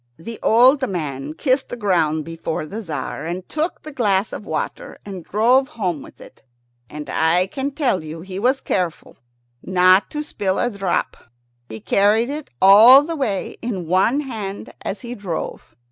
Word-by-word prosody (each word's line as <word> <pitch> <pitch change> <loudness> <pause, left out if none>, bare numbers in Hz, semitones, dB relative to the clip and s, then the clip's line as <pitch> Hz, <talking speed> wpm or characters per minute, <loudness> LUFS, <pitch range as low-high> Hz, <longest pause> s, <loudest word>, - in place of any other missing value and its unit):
The 225 +7 -9
old 260 +4 +4
man 150 -5 -4
kissed 265 - 0
the 245 - -5
ground 165 -8 +1
before 165 -1 -4
the 210 +8 -6
Tzar, 165 -8 -5
and 175 +3 -5
took 315 +2 -3
the 310 - -8
glass 205 -6 0
of 210 - -7
water - - -4
and 190 -4 -7
drove 245 +8 +3
home 185 - -3
with - - -14
it, - - -15 0.5
and 150 -1 -8
I 165 +5 +2
can 265 +8 -4
tell 265 - -1
you 160 +1 -8
he 190 +1 -7
was 260 +5 +1
careful 180 -4 -3 0.4
not 185 +1 +4
to 300 0 -4
spill 195 -9 -2
a 245 - 0
drop. 195 -3 -2 0.5
He 110 0 -7
carried 210 - +2
it 300 0 -6
all 225 +8 +9
the 330 +2 -4
way 225 -10 -2
in 205 -7 -4
one 190 - +2
hand 215 -8 -6
as 200 - -5
he 240 -1 -6
drove. 180 - -6
200 Hz, 170 wpm, -20 LUFS, 175-250 Hz, 0.5 s, all